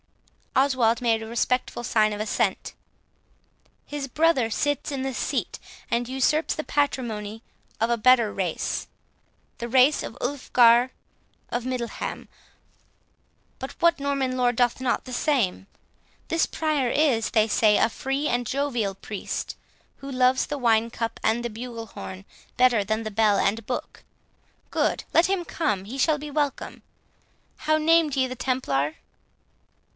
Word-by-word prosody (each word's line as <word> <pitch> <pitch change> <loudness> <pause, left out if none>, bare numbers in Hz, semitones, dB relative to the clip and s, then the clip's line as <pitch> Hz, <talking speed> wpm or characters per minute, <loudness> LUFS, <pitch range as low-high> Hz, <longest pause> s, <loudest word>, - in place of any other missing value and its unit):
Oswald 255 -4 +3
made 230 -3 +1
a - - -7
respectful 240 +1 -1
sign 215 -2 +2
of 210 - -4
assent. 215 - -1 1.1
"His 290 -2 -5
brother 275 -4 +2
sits 290 +6 -1
in 270 -2 -3
the 265 0 -2
seat, - - -2 0.3
and 240 +1 0
usurps 270 +4 +1
the 310 - -3
patrimony, 225 -8 -2 0.4
of 225 - +1
a 235 - +2
better 235 -2 +4
race, 180 -4 -2 0.7
the 235 0 -4
race 260 +4 +4
of 225 - -7
Ulfgar 245 -2 +4 0.6
of 240 0 -3
Middleham; 250 -2 -4 1.3
but 265 - -6
what 335 -2 +3
Norman 275 -2 -1
lord 245 -1 +2
doth 245 +1 +1
not 255 -2 0
the 255 - -8
same? 240 - 0 0.6
This 330 - +2
Prior 300 -5 0
is, 255 -6 +2
they 220 -1 +3
say, 210 -1 +4
a - - +4
free 270 +5 -2
and 245 -2 0
jovial 245 -7 -1
priest, 205 +1 -5 0.4
who 275 0 -8
loves 255 0 +2
the 290 - -3
wine 230 -3 +2
cup 230 -1 -4
and 235 +2 +1
the - - -1
bugle 230 0 -7
horn 190 -1 -9 0.3
better 250 -4 +4
than 215 +2 -2
bell 215 -1 +2
and 215 +2 0
book: 245 - -5 0.7
Good; - - 0
let 335 - +5
him 380 -2 -1
come, 210 - -1
he 245 +7 -7
shall 305 +2 +3
be 295 0 -7
welcome. 290 -1 -2 0.8
How 310 0 +1
named 315 -2 +3
ye 265 -1 +2
the 255 - -6
Templar?" 155 - -1
250 Hz, 145 wpm, -25 LUFS, 225-275 Hz, 1.3 s, let